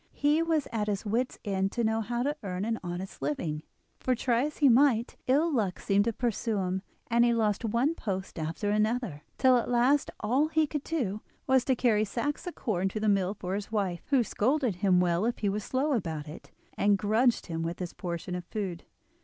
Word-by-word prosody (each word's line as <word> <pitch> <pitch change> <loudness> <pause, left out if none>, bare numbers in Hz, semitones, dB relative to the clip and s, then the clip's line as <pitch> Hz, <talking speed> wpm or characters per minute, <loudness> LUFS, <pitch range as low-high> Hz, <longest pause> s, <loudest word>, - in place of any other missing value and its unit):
He 295 +3 +3
was 325 -3 +1
at 215 -2 -1
his 205 +1 -2
wits' 235 +5 -1
end 195 -1 0
to 240 - 0
know 220 0 +1
how 240 +2 -2
to 290 +2 0
earn 190 -1 -3
an 225 0 -1
honest 175 0 -6
living, 150 +2 -2 0.4
for 255 - +1
try 240 +1 +1
as 300 - -5
he 290 - +5
might 245 -2 +4
ill 300 +5 +3
luck 205 -8 0
seemed 200 +1 +2
to 230 - +1
pursue 230 -1 -1
him, 190 0 -1 0.3
and 235 0 +5
he 240 -1 +3
lost 215 -2 +1
one 235 +7 +1
post 190 - -4
after 165 +7 -2
another, 215 - 0 0.2
till 255 -1 +5
at 240 - -1
last 250 +4 +3
all 255 +8 +2
he 315 0 +2
could 295 -1 -4
do 220 -11 -2 0.2
was 260 -1 +4
to 260 - +2
carry 230 -4 +3
sacks 290 - -3
of 355 - -5
corn 195 -5 -1
to 215 - -4
the 215 - 0
mill 195 0 +1
for 185 -1 -4
his 205 +1 -4
wife, 195 -5 -1
who 270 -4 +3
scolded 245 - 0
him 185 -2 +3
well 175 +1 +1
if 240 +2 0
he 205 - 0
was 205 +1 -2
slow 275 +6 0
about 160 - -2
it, 150 - -10 0.3
and 200 0 +3
grudged 220 +5 +2
him 165 -2 -3
his 180 -2 -5
portion 175 -1 -5
of 180 0 -3
food. 190 -6 -4
220 Hz, 210 wpm, -29 LUFS, 190-255 Hz, 0.4 s, he